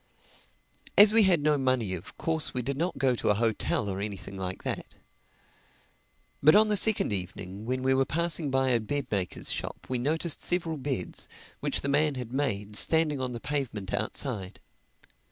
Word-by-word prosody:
As 205 +1 +9
we 225 - +7
had 185 -6 +4
no 150 -1 +3
money 130 -7 +1
of 90 -1 -8
course 160 -4 -1
we 125 - -1
did 140 +3 -2
not 170 +6 -2
go 130 -2 +2
to 120 - -1
a 105 - +4
hotel 110 -1 0
or 95 0 -3
anything 100 -2 -6
like 95 -1 -5
that. - - -3 1.5
But 155 +2 +7
on 215 +1 +5
the 210 - +3
second 205 - +3
evening 95 +2 -5
when 130 +1 -1
we 130 0 +3
were 135 0 +3
passing 165 +1 -1
by 135 0 +2
a 120 -2 +3
bed 140 +6 -3
maker's 95 -4 -1
shop - - -5
we 130 -1 -1
noticed 155 +5 -1
several 170 -3 0
beds, 130 -9 -4 0.3
which - - 0
the - - -3
man 145 +1 +2
had 125 -2 -6
made, 105 -7 -2
standing 155 +1 +3
on 125 -1 -3
the 120 - -5
pavement 115 -9 -3
outside. 105 -9 -3
130 Hz, 180 wpm, -28 LUFS, 105-155 Hz, 1.5 s, As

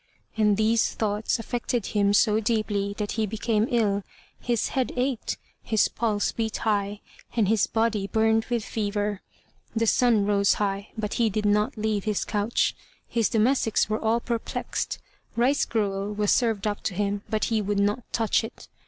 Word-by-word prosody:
And 210 -2 +3
these 220 +1 +2
thoughts 210 +1 0
affected 240 0 -2
him 205 -2 +2
so 210 +1 +4
deeply 205 -3 -1
that 210 -1 -2
he 220 -1 0
became 220 +1 0
ill, 210 -4 +1 0.4
his 240 -2 0
head 260 -2 -1
ached, 250 -1 -1 0.2
his 220 -2 +2
pulse 215 -3 0
beat 220 -1 -2
high, 205 -1 -1 0.3
and 220 -4 +3
his 220 +1 +3
body 220 -3 0
burned 220 +1 +2
with 235 -3 -2
fever. 205 -1 -2 0.5
The 225 0 +2
sun 225 -2 +3
rose 200 -1 +3
high, 200 0 -2
but 210 -1 -2
he 225 - +4
did 210 +1 -2
not 210 +2 +2
leave 215 -2 -1
his 210 -2 0
couch. 210 +2 0 0.3
His 230 -2 +1
domestics 225 -1 +2
were 215 - +1
all 225 +1 +2
perplexed. 235 -1 -3 0.4
Rice 260 +4 +2
gruel 200 -2 -1
was 210 -1 +1
served 225 -5 +1
up 205 -1 -1
to 195 - -1
him, 205 +1 -1
but 215 -1 0
he 220 - +2
would 205 0 -1
not 205 +4 +1
touch 225 0 +1
it. 225 - -9
215 Hz, 170 wpm, -26 LUFS, 205-225 Hz, 0.5 s, so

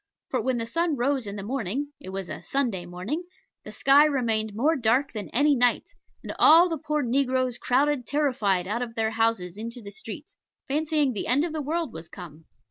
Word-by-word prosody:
For - - 0
when 260 -2 0
the 230 - -2
sun 330 +6 0
rose 260 -1 0
in 200 - -5
the 200 - -6
morning 265 +4 -3
(it 185 - -10
was 190 -1 -5
a - - -7
Sunday 230 -11 -2
morning), 195 - -4 0.4
the - - -9
sky 275 +2 +5
remained 225 -7 0
more 295 +9 +2
dark 250 +1 +1
than 210 -3 -5
any 285 +3 +3
night, 245 -1 +1 0.3
and - - -5
all 335 +3 +7
the 325 -3 -3
poor 300 -1 -1
negroes 255 0 0
crowded 270 0 +1
terrified 245 -11 +1
out 225 +4 -2
of 235 -2 -5
their 220 -1 0
houses 225 -5 0
into 230 +2 -6
the 200 -3 -9
streets, 245 +6 -8 0.3
fancying 300 -1 +1
the 205 - -4
end 270 +5 +3
of 335 -2 -3
the 310 - -2
world 315 -1 -2
was 160 0 -9
come. 165 -4 -11
245 Hz, 205 wpm, -26 LUFS, 215-290 Hz, 0.4 s, all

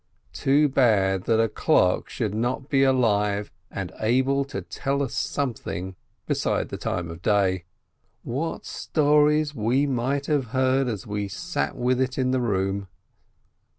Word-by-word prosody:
Too 145 +3 +3
bad, 100 -8 +2
that 115 -1 +2
a 115 - +4
clock 90 -3 +2
should 110 -5 -2
not 125 +5 -2
be 135 -2 +3
alive 105 -6 +2 0.2
and - - -5
able 130 +5 +2
to 140 - -6
tell 140 0 -2
us 135 - -4
something 95 -8 -3 0.3
beside - - -1
the - - -5
time 85 -1 -3
of 85 +1 -10
day! 95 -3 +1 0.6
What 145 +7 -3
stories 150 0 +2
we 125 +3 +1
might 135 +1 -1
have 145 -4 +1
heard 130 0 +2
as 110 -6 -4
we 105 -1 -3
sat 80 -6 -3
with 125 +1 +1
it 130 -1 -1
in 130 -1 +1
the 130 -1 +1
room! 95 -3 -1
125 Hz, 150 wpm, -25 LUFS, 100-135 Hz, 0.6 s, a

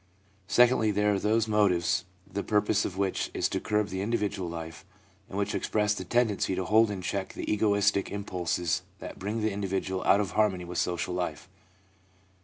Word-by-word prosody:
Secondly, 120 +2 +4
there 105 0 +2
are 100 - 0
those 110 +2 +1
motives, 90 -5 +2 0.2
the 100 - -4
purpose 105 0 +1
of 95 - -5
which 95 -1 -1
is - - +1
to - - -1
curb 105 -1 0
the 95 0 -3
individual 100 -4 -1
life, 80 +1 -7 0.5
and 95 - -6
which 100 0 -1
express 105 -1 +1
the 95 - -5
tendency 105 -2 +1
to 95 - -2
hold 110 +2 +4
in 95 -3 -5
check 95 +1 -3
the - - -6
egoistic 100 -2 +2
impulses 90 -3 -1 0.2
that - - -9
bring 105 +4 -3
the 110 - +1
individual 95 -1 -2
out 100 - +5
of 105 - -1
harmony 95 -5 +1
with 90 0 -3
social 90 0 -1
life. 90 -3 -3
100 Hz, 180 wpm, -28 LUFS, 95-105 Hz, 0.5 s, out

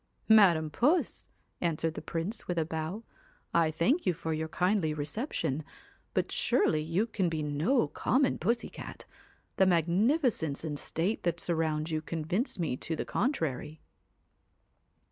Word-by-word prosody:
4 220 - +9
Madam 170 -7 +5
Puss! 300 - +1 0.2
' - - -45
answered 165 -1 0
the - - -6
Prince, 180 +7 -4
with 175 - -2
a 160 - +2
bow, 160 +7 -4 0.2
' - - -34
I 165 -2 +4
thank 170 - +1
you 180 - +2
for 160 -1 -3
your 160 +1 -2
kindly 180 -2 +1
reception; 155 - -2 0.5
but - - 0
surely 155 -1 +2
you 170 +7 0
can 195 -6 -1
be 160 -2 -2
no 150 - +1
common 255 - +1
pussy 235 +1 0
cat. - - -8 0.5
The 190 - +5
magnifi 190 - +3
cence 150 -3 -3
and 150 -3 -2
state 180 +7 -1
that 170 -1 -1
surround 160 -2 -1
you 155 -1 -1
convince 165 - -2
me 160 -8 -1
to 160 - -3
the - - -3
contrary.' 160 - -2
165 Hz, 160 wpm, -30 LUFS, 155-205 Hz, 0.5 s, 4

